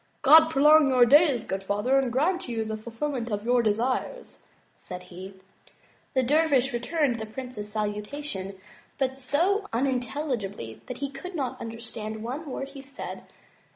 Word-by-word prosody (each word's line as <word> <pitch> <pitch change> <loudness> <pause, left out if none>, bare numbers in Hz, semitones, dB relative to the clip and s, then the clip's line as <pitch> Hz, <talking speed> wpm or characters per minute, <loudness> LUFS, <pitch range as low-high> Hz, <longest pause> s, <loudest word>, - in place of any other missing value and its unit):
'*God 315 +3 +8
prolong 300 0 +6
your 250 -2 +6
days, 280 -2 +5
good 195 -2 -4
father, 210 +8 +2
and 260 -3 -1
grant 325 +8 0
you 225 -2 -2
the 220 0 -3
ful 220 +2 -9
filment 245 0 -3
of 205 0 -3
your 245 0 +3
desires," 245 - -1 0.4
said 180 0 -9
he. 185 +2 -10 0.8
The 260 - +3
dervish 275 -1 +3
returned 245 0 0
the 220 - -5
prince's 220 -3 -7
salutation, 210 -1 -4 0.4
but 265 -1 -1
so 360 +11 +1
unin 255 +2 +1
telligibly 220 - -4
that 250 - -6
he 275 - -6
could 355 +7 -8
not 260 -4 -3
imderstand 225 -1 -6
one 275 +7 -5
word 270 +1 -5
he 275 -1 -10
said. 275 0 -8
255 Hz, 155 wpm, -27 LUFS, 220-285 Hz, 0.8 s, God